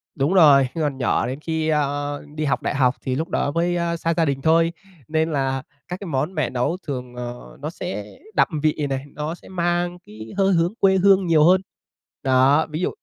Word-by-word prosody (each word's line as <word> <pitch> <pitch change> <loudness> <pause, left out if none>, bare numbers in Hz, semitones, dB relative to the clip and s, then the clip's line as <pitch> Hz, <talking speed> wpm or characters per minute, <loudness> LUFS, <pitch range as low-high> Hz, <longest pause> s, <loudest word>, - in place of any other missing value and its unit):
đúng 145 +5 +1
rồi, 140 -7 +6
còn 145 -4 -1
nhỏ 125 - +1
đến 130 +3 -4
khi, 160 0 -2
ơ, 145 -1 -1
đi 155 0 -2
học 140 - 0
đại - - -2
học 130 -1 +3
thì 130 -1 -2
lúc 160 +6 -3
đó 145 - 0
mới, 170 +2 0
a, 170 -1 -1
xa 165 +1 0
gia 165 - +3
đình 135 -2 -1
thôi 165 +2 +3 0.4
nên 160 +1 0
là 135 -2 -1 0.2
các 180 +2 -5
cái 200 - -7
món 150 +5 -1
mẹ 150 -6 0
nấu 130 +8 -1
thường, 125 -3 -5
ờ, 120 - -8
nó - - -3
sẽ 100 +1 -5 0.3
đậm - - +4 0.2
vị 150 -1 +1
này, 135 +1 -3
nó 150 +3 -4
sẽ - - -17
mang 175 0 -1
cái 110 +1 -10
hơi 195 -1 +3
hướng 170 +3 +2
quê 190 -1 +4
hương 190 -1 +4
nhiều 155 -2 +5
hơn. 185 +3 +5 0.6
Đó, 135 +4 +4
ví 155 +3 -4
dụ - - +1
155 Hz, 215 wpm, -22 LUFS, 135-170 Hz, 0.6 s, rồi